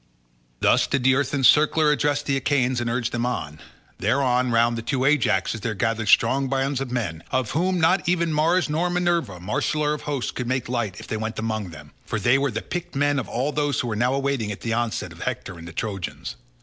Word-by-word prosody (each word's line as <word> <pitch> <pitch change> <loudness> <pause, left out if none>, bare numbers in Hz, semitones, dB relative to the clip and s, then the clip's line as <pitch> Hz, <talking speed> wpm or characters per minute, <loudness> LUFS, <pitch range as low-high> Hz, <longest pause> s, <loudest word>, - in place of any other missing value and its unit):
Thus - - +4
did 140 -3 0
the 130 +1 +5
earth 135 0 0
encircler 150 +3 +4
address 145 0 0
the 140 -1 0
Achaeans 130 -2 +1
and 120 - -1
urge 120 0 -1
them 120 0 -2
on. 80 -11 -3 0.4
Thereon 125 +3 +2
round 115 0 +3
the 115 - -3
two 130 +2 -2
Ajaxes 110 -7 +2
there 110 +2 -2
gathered 110 +2 -1
strong 135 +5 +4
bands 135 0 0
of 135 - -3
men, 105 -10 -3
of 130 -4 0
whom 180 +3 +1
not 175 +2 +2
even 170 -2 +1
Mars 165 +4 +2
nor 160 +4 0
Minerva, 175 - 0
marshaller 150 - 0
of 150 - -5
hosts 140 -4 -3
could 125 - -4
make 130 0 -1
light 120 -6 -2
if - - -9
they 110 - -3
went 110 +1 -4
among 110 -3 -2
them, 75 -2 -12
for 115 - -3
they 120 +6 +3
were 140 0 +1
the 110 -2 -4
picked 175 -4 -5
men 145 0 +2
of 125 - -5
all 130 +5 -1
those 145 -1 0
who 125 - -1
were 110 - -2
now 125 +4 +1
awaiting 135 -6 -1
the 115 - -2
onset 120 -1 -2
of - - -12
Hector 85 - -4
and 85 - -10
the - - -8
Trojans. 95 -1 -5
130 Hz, 220 wpm, -24 LUFS, 115-145 Hz, 0.4 s, the